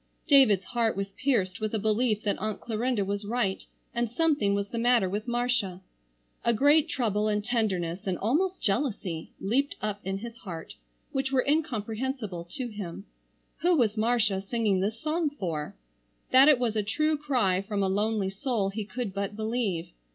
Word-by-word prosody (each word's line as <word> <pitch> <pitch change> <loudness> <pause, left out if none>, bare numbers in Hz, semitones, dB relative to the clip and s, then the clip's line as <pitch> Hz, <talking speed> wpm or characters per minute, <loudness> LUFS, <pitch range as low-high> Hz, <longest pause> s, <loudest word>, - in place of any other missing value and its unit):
David's 220 -10 +5
heart 230 -4 0
was 195 0 -3
pierced 210 -6 0
with 215 +1 -1
a - - +2
belief 215 +1 +1
that 205 - 0
Aunt 215 +1 -3
Clarinda 230 -2 -1
was 200 +1 -2
right 205 -2 -1 0.3
and 235 -1 0
something 285 -7 +2
was 200 0 -1
the 235 - -3
matter 240 -4 +4
with 205 +5 -3
Marcia. 240 -6 0 0.6
A 235 - +3
great 290 +6 +4
trouble 215 - 0
and 210 -1 0
tenderness, 195 -6 -1
and 185 -2 0
almost 345 - 0
jealousy, 200 - -1
leaped 265 +8 0
up 210 -1 -3
in 195 0 -2
his 230 +3 -8
heart 170 -8 -8 0.4
which 270 0 -1
were 260 -2 +2
incomprehensible 235 - -1
to 255 +1 -4
him. 200 -3 -7 0.6
Who 355 0 +4
was 225 -5 +2
Marcia 220 -3 +2
singing 205 -2 0
this 215 +4 -1
song 315 0 0
for? 170 - -4 0.6
That 265 +3 +8
it 295 - +6
was 240 -3 0
a 215 - +2
true 305 +9 +1
cry 250 -11 +1
from 200 0 -2
a - - +2
lonely 205 0 0
soul 205 -1 -1
he 210 +1 -4
could 235 -2 -4
but 200 +1 -3
believe. 220 -6 -2
220 Hz, 175 wpm, -28 LUFS, 200-250 Hz, 0.6 s, That